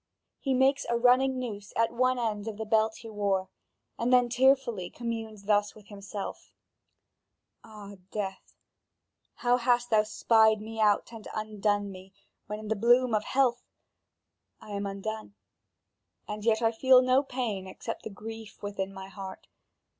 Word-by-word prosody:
He 270 Hz, -2 st, 0 dB
makes 270 Hz, +2 st, +3 dB
a 235 Hz, -, +2 dB
running 255 Hz, +2 st, +4 dB
noose 210 Hz, -5 st, -6 dB
at 230 Hz, 0 st, +1 dB
one 255 Hz, +1 st, +2 dB
end 220 Hz, -3 st, -2 dB
of 215 Hz, -2 st, -5 dB
the 220 Hz, -, -4 dB
belt 220 Hz, 0 st, +2 dB
he 230 Hz, -, -10 dB
wore, 200 Hz, -3 st, 0 dB, 0.5 s
and 235 Hz, +2 st, +1 dB
then 250 Hz, -1 st, +5 dB
tearfully 250 Hz, -7 st, +2 dB
communes 225 Hz, -3 st, -5 dB
thus 205 Hz, 0 st, +1 dB
with 210 Hz, -2 st, -16 dB
himself: 200 Hz, 0 st, -7 dB, 1.1 s
"Ah, 205 Hz, -2 st, -11 dB
death, 195 Hz, -2 st, -5 dB, 0.8 s
how 245 Hz, -1 st, +2 dB
hast 245 Hz, -1 st, +1 dB
thou 215 Hz, -1 st, +6 dB
spied 220 Hz, 0 st, +3 dB
me 220 Hz, +1 st, -7 dB
out 210 Hz, 0 st, +3 dB
and 225 Hz, -2 st, -9 dB
undone 210 Hz, -1 st, -1 dB
me, 190 Hz, +1 st, -12 dB, 0.3 s
when 210 Hz, 0 st, -4 dB
in 215 Hz, 0 st, -8 dB
the 220 Hz, -, +1 dB
bloom 240 Hz, +3 st, +4 dB
of 215 Hz, 0 st, +1 dB
health! 250 Hz, -2 st, +2 dB, 1.0 s
I 210 Hz, -, -12 dB
am 200 Hz, 0 st, -2 dB
undone, 205 Hz, +1 st, -5 dB, 0.9 s
and 210 Hz, 0 st, -5 dB
yet 225 Hz, 0 st, +2 dB
I 225 Hz, -, +4 dB
feel 255 Hz, +2 st, +5 dB
no 255 Hz, +1 st, +4 dB
pain 240 Hz, -8 st, -3 dB
except 230 Hz, +4 st, -6 dB
the -, -, -6 dB
grief 220 Hz, +1 st, -9 dB
within 195 Hz, -1 st, -3 dB
my 190 Hz, 0 st, -9 dB
heart. 190 Hz, 0 st, -9 dB
220 Hz, 155 wpm, -29 LUFS, 205-240 Hz, 1.1 s, thou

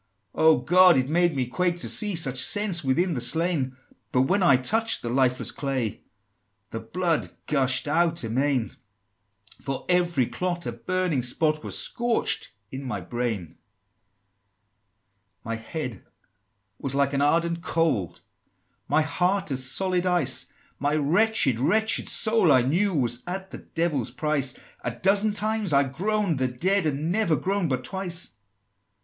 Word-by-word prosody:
"Oh, 160 Hz, 0 st, +4 dB
God! 180 Hz, -1 st, +5 dB
it 130 Hz, +1 st, 0 dB
made 175 Hz, 0 st, +2 dB
me 130 Hz, -2 st, 0 dB
quake 175 Hz, +8 st, -1 dB
to -, -, -1 dB
see 210 Hz, -3 st, +1 dB
Such 135 Hz, -6 st, 0 dB
sense 205 Hz, -5 st, +1 dB
within 170 Hz, +7 st, +1 dB
the 125 Hz, -, -3 dB
slain! 145 Hz, -2 st, -1 dB, 0.3 s
But 125 Hz, -, +3 dB
when 190 Hz, +8 st, +1 dB
I 140 Hz, -8 st, +5 dB
touched 225 Hz, -, +1 dB
the 120 Hz, -, -3 dB
lifeless 130 Hz, 0 st, +1 dB
clay, 130 Hz, -6 st, -3 dB, 0.7 s
The 115 Hz, -, -4 dB
blood 165 Hz, +9 st, -1 dB, 0.2 s
gush'd 130 Hz, -2 st, +1 dB
out 165 Hz, +1 st, +1 dB
amain! 125 Hz, +1 st, 0 dB, 0.9 s
For 135 Hz, -1 st, -4 dB
every 175 Hz, -7 st, +2 dB
clot, 175 Hz, +5 st, -3 dB
a -, -, -2 dB
burning 175 Hz, +4 st, -1 dB
spot 155 Hz, +5 st, 0 dB
Was -, -, -2 dB
scorching 240 Hz, -1 st, 0 dB, 0.2 s
in 135 Hz, +1 st, -6 dB
my 110 Hz, -7 st, -4 dB
brain!" 110 Hz, 0 st, -3 dB
XIX. -, -, -22 dB, 1.9 s
"My 115 Hz, +1 st, -3 dB
head 120 Hz, -, -6 dB, 0.8 s
was 135 Hz, -1 st, -3 dB
like 140 Hz, 0 st, +1 dB
an 140 Hz, -, 0 dB
ardent 170 Hz, +3 st, +1 dB
coal, 160 Hz, -, 0 dB, 0.7 s
My 155 Hz, -, +2 dB
heart 180 Hz, +3 st, 0 dB
as 130 Hz, -1 st, +1 dB
solid 185 Hz, +2 st, 0 dB
ice: 135 Hz, -8 st, 0 dB, 0.3 s
My 145 Hz, +2 st, 0 dB
wretched, 155 Hz, -, +3 dB
wretched 220 Hz, -, +1 dB
soul, 220 Hz, -7 st, +3 dB
I 125 Hz, -, +5 dB
knew, 175 Hz, +10 st, +1 dB
Was 120 Hz, -3 st, 0 dB
at 190 Hz, +1 st, -5 dB
the -, -, -8 dB
Devil's 165 Hz, -8 st, -2 dB
price: 150 Hz, -4 st, -1 dB, 0.3 s
A -, -, -1 dB
dozen 200 Hz, -, +3 dB
times 215 Hz, -2 st, -1 dB
I 140 Hz, 0 st, +5 dB
groan'd 180 Hz, +3 st, -1 dB
the 130 Hz, -, +1 dB
dead 180 Hz, +9 st, 0 dB
Had 150 Hz, -3 st, 0 dB
never 170 Hz, +4 st, 0 dB
groan'd 190 Hz, 0 st, -1 dB
but 130 Hz, -, -2 dB
twice!" 185 Hz, -2 st, -4 dB
155 Hz, 150 wpm, -25 LUFS, 130-180 Hz, 1.9 s, God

